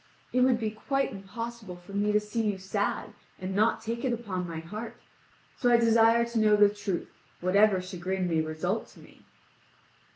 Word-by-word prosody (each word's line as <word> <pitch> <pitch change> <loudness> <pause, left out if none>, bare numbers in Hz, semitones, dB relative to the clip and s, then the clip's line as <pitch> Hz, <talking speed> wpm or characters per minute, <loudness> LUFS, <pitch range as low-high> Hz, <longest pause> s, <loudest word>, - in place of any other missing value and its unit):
"It 250 - +3
would 250 -2 +4
be 220 -2 -1
quite 275 +5 -1
impossible 215 0 -7
for 175 +2 -14
me 205 +1 +1
to 210 - +4
see 210 +2 -3
you 195 - -6
sad 200 +2 -2 0.2
and 190 0 -5
nor 215 +3 +3
take 230 +1 -5
it 260 - +1
upon 200 -7 -3
my 165 -1 -5
heart, 215 +8 -7 0.6
so 245 - +1
I 240 - +6
desire 230 0 +4
to 235 -1 -2
know 215 -1 +5
the 205 0 +6
truth, 200 -4 -4 0.3
whatever 195 +2 +4
chagrin 185 0 -3
may 165 -2 +1
result 160 +7 -2
to - - -17
me." - - -17
210 Hz, 185 wpm, -28 LUFS, 185-230 Hz, 0.6 s, I